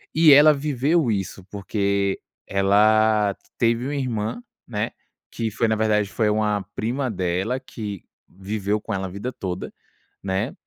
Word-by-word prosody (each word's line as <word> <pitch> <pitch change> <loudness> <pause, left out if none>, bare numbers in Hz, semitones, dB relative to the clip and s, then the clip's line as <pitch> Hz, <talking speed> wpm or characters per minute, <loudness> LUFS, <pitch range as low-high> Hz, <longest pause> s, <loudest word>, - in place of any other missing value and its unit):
E 160 -1 +7
ela 150 +2 +8
viveu 145 0 +1
isso, 95 -2 -3
porque 100 0 -1 0.3
ela 105 +1 +3 0.2
teve 115 +1 +1
uma 145 +2 -2
irmã 120 - -2 0.3
né, 110 -1 -2 0.4
que 115 -1 -3
foi 115 - 0
na 110 - +2
verdade 105 -2 +1
foi 110 +1 +1
uma 105 -1 +1
prima 125 +4 -1
dela 95 +6 -1
que 105 -7 -7 0.2
viveu 100 +2 -3
com - - -5
ela 95 0 -2
a - - -8
vida 100 +7 -5
toda, 95 -7 -5 0.5
né, 100 +5 -1
105 Hz, 145 wpm, -23 LUFS, 100-120 Hz, 0.5 s, ela